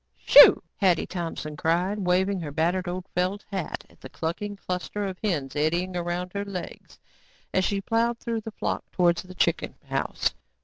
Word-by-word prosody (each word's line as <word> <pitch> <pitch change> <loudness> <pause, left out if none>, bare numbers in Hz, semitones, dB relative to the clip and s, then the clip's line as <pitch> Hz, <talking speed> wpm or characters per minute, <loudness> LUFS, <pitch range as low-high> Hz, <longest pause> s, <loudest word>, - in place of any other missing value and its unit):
"Shoo," - - +9
Hetty 185 -4 +3
Thompson 165 -4 -5
cried, 175 +7 0
waving 190 +1 +1
her 160 -4 -5
battered 175 +5 0
old 180 +1 -4
felt 185 +3 -1
hat 190 -5 -4
at - - -24
the - - -9
clucking 205 +6 -4
cluster 195 +2 -4
of 190 -2 -5
hens 150 -10 -1
eddying 170 +5 0
around 175 +1 -3
her 200 0 -2
legs 195 -3 -8 0.6
as 185 - +2
she 200 -1 0
plowed 230 +3 +1
through 230 -1 -3
the 225 - -6
flock 215 - -3
towards 175 -1 +2
the 185 0 -12
chicken 170 -2 0
house. - - -1
180 Hz, 170 wpm, -26 LUFS, 170-200 Hz, 0.6 s, Shoo